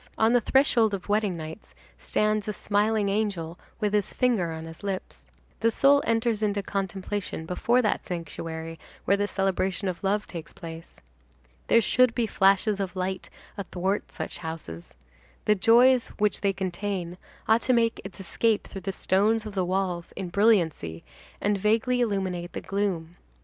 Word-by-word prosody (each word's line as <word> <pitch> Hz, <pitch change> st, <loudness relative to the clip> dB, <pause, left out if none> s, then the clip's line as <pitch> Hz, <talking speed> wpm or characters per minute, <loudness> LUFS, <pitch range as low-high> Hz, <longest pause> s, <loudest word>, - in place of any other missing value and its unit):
On 220 Hz, +2 st, +4 dB
the 245 Hz, -, +4 dB
threshold 230 Hz, -4 st, +3 dB
of 190 Hz, +1 st, -9 dB
wedding 205 Hz, -4 st, +1 dB
nights 160 Hz, +5 st, -9 dB, 0.2 s
stands 215 Hz, 0 st, 0 dB
a 210 Hz, -, -1 dB
smiling 205 Hz, +1 st, +1 dB
angel 195 Hz, -5 st, -2 dB, 0.2 s
with 210 Hz, -2 st, 0 dB
his 205 Hz, -2 st, +1 dB
finger 230 Hz, -10 st, +1 dB
on 160 Hz, 0 st, -6 dB
his 165 Hz, 0 st, -10 dB
lips. 195 Hz, -2 st, -5 dB, 0.3 s
The 230 Hz, -, +3 dB
soul 280 Hz, +5 st, +4 dB
enters 225 Hz, -1 st, +1 dB
into 205 Hz, -1 st, 0 dB
contemplation 195 Hz, -2 st, -3 dB
before 235 Hz, +8 st, +2 dB
that 210 Hz, -, 0 dB
sanctuary 165 Hz, -1 st, -5 dB, 0.3 s
where 200 Hz, -, +4 dB
the 205 Hz, 0 st, 0 dB
celebration 195 Hz, 0 st, -1 dB
of 185 Hz, +1 st, -4 dB
love 205 Hz, +2 st, +1 dB
takes 160 Hz, -4 st, -8 dB
place. 165 Hz, 0 st, -10 dB, 0.7 s
There 230 Hz, -, +5 dB
should 250 Hz, +1 st, +3 dB
be 240 Hz, -, +1 dB
flashes 200 Hz, 0 st, +3 dB
of 190 Hz, -2 st, -3 dB
light 185 Hz, 0 st, -3 dB, 0.3 s
athwart 190 Hz, +1 st, -2 dB
such -, -, -6 dB
houses. 160 Hz, -, -7 dB, 0.5 s
The 210 Hz, -, +5 dB
joy 235 Hz, +6 st, +6 dB, 0.2 s
which 210 Hz, -1 st, +1 dB
they 200 Hz, -, +2 dB
contain 185 Hz, -1 st, -4 dB, 0.3 s
ought 225 Hz, +1 st, +4 dB
to 255 Hz, -, +1 dB
make 230 Hz, -1 st, +2 dB
its 195 Hz, +1 st, -9 dB
escape 215 Hz, +3 st, 0 dB
through 195 Hz, -, -8 dB
the 195 Hz, -, -3 dB
stones 210 Hz, +4 st, +1 dB
of 215 Hz, -, -6 dB
the 190 Hz, -2 st, 0 dB
walls 180 Hz, -2 st, -2 dB
in 185 Hz, -2 st, -5 dB
brilliancy, 170 Hz, -, +2 dB, 0.4 s
and 205 Hz, -1 st, +1 dB
vaguely 225 Hz, +5 st, +2 dB
illuminate 190 Hz, -6 st, -1 dB
the -, -, -4 dB
gloom. 185 Hz, -4 st, -2 dB
200 Hz, 160 wpm, -26 LUFS, 180-215 Hz, 0.7 s, joy